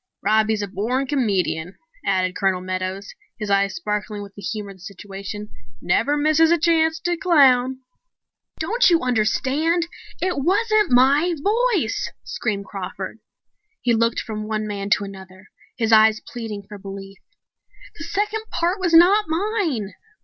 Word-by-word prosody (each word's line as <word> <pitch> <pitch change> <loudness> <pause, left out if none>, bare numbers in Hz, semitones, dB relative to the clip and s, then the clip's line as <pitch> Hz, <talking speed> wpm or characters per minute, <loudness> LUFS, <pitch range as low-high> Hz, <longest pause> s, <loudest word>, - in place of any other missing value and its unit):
"Robbie's 215 0 +2
a - - -3
born 235 +8 -1
comedian," 195 - -1 0.3
added 185 -1 0
Colonel 190 -2 +1
Meadows, 185 +2 -4 0.2
his 210 -3 -4
eyes 200 0 +2
sparkling 210 0 -3
with 200 -1 -12
the 205 - -11
humor 205 +1 -4
of 195 - -14
the - - -21
situation. 200 +2 -8 0.3
"Never 255 - +1
misses 310 +2 +4
a 340 - +4
chance 320 -1 +2
to 350 0 0
clown." 265 -7 +3 0.8
"Don't 455 +10 +2
you 335 -2 +3
understand 265 +8 +1 0.3
it 365 -5 -1
wasn't 425 +3 +2
my 280 +8 +4
voice!" 415 - 0
screamed 200 -4 -3
Crawford. 195 +1 -6 0.6
He 240 - +1
looked 230 0 +1
from 215 -1 -6
one 215 0 -2
man 200 -1 -4
to 210 - +3
another, 190 -1 -11 0.3
his 225 -1 0
eyes 220 0 +6
pleading 225 -5 -7
for 205 -1 -10
belief. 195 0 -9 0.8
"The - - -5
second 420 +4 -2
part 350 +4 -1
was 350 -3 +2
not 390 +6 +6
mine!" 325 - -1
225 Hz, 145 wpm, -22 LUFS, 200-330 Hz, 0.8 s, eyes